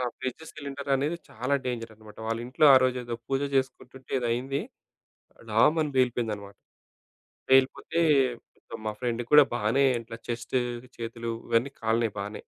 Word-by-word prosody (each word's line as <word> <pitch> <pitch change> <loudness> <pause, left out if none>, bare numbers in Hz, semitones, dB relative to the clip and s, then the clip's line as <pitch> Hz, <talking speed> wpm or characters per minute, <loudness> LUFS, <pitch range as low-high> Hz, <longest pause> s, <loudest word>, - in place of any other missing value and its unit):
ఆహ్, 125 -1 -1
fridge 130 +4 -5
cylinder 140 -1 -6
అనేది 145 +5 -1
చాలా 130 +4 -1
డేంజర్ 115 -2 -4
అనమాట. 110 -1 -15
వాళ్ళింట్లో 120 +5 0
ఆ - - +8
రోజు 130 0 +2
ఏదో 120 0 -4
పూజ 135 0 0
జేసుకుంటుంటే 130 0 -3
ఏదో 120 - -2
అయింది. 135 +4 -2 0.9
డామని 150 +8 +3
పేలిపోయిందనమాట. 110 -5 0 0.9
పేలిపోతే 135 +5 +3 0.6
ఇక - - -9
మా 110 - 0
ఫ్రెండ్ 120 -2 -1
కూడా 150 -1 +9
బానే 120 +5 +2 0.2
ఇట్లా 115 0 -9
చెస్టు 120 +2 -2 0.4
చేతులు 115 0 -4 0.2
ఇవన్నీ 120 +4 +2
కాలినాయి 110 -1 +1
బానే. 105 +1 -5
125 Hz, 140 wpm, -27 LUFS, 115-135 Hz, 0.9 s, కూడా